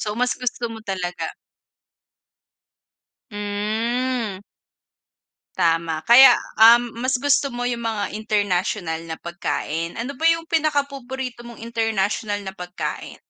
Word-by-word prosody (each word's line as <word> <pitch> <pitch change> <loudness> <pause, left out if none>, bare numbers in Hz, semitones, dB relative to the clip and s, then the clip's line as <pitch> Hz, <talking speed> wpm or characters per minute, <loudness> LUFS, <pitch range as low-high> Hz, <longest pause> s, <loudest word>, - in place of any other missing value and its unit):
So, 210 0 -3
mas 250 +1 0
gusto 245 -1 -3
mo 225 - -9
talaga. 180 -3 -3 2.0
Hmm. 215 +2 -2 1.2
Tama. 165 -1 +1
Kaya, 250 +6 +9 0.2
um, 235 +1 +6
mas 255 +1 +1
gusto 285 +1 +2
mo 245 -2 -4
'yong 245 -1 -1
mga 220 -3 -2
international 195 -5 -1
na 160 - -4
pagkain. 170 -1 -4
Ano 245 +4 -4
ba 320 +5 +1
'yong 330 0 +2
pinaka 310 -3 +1
paborito 265 -2 -7
mong 235 - -11
international 215 -2 -1
na 190 - -5
pagkain? 180 -1 -6
225 Hz, 115 wpm, -22 LUFS, 195-250 Hz, 2.0 s, Kaya